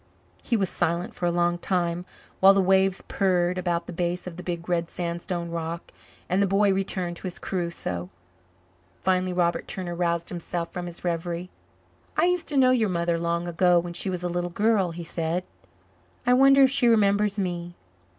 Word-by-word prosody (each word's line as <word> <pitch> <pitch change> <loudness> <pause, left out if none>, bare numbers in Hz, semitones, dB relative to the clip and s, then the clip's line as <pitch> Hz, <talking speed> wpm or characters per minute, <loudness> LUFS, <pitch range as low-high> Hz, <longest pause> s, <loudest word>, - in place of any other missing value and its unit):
He 235 - 0
was 195 -3 0
silent 170 +2 -1
for 175 - -2
a - - +2
long 175 0 +1
time, 175 -1 -1 0.3
while 195 +1 +7
the - - +4
waves 190 0 +3
purred 180 -2 +1
about 175 -1 -1
the - - -7
base 175 +1 -2
of 180 -2 -7
the 180 - -7
big 170 -1 -5
red 170 -2 0
sandstone 170 0 -4
rock 165 0 -5 0.4
and 185 +2 +1
the 200 - +3
boy 195 +1 +3
returned 185 -2 -2
to 185 - -6
his 180 - -6
Crusoe. 170 - -4 0.9
Finally 185 0 +1
Robert 175 -1 0
Turner 180 -2 -4
roused 170 -1 -1
himself 170 -1 -4
from 180 -1 -4
his 175 0 -8
reverie. 170 +1 -2 0.7
"I - - +4
used 360 -1 +1
to 295 - -2
know 255 -1 +6
your 225 -5 +2
mother 170 -1 0
long 170 +1 -1
ago 175 +1 +3
when 170 0 -1
she 185 +3 -1
was 180 -1 -3
a - - 0
little 175 0 -2
girl," 205 0 +2
he 170 +1 -6
said. 165 +2 -2 0.8
"I 245 - +4
wonder 275 +2 +7
if 265 - +5
she 260 -3 +3
remembers 210 -2 +3
me. 175 -2 -3
175 Hz, 190 wpm, -26 LUFS, 170-195 Hz, 0.9 s, while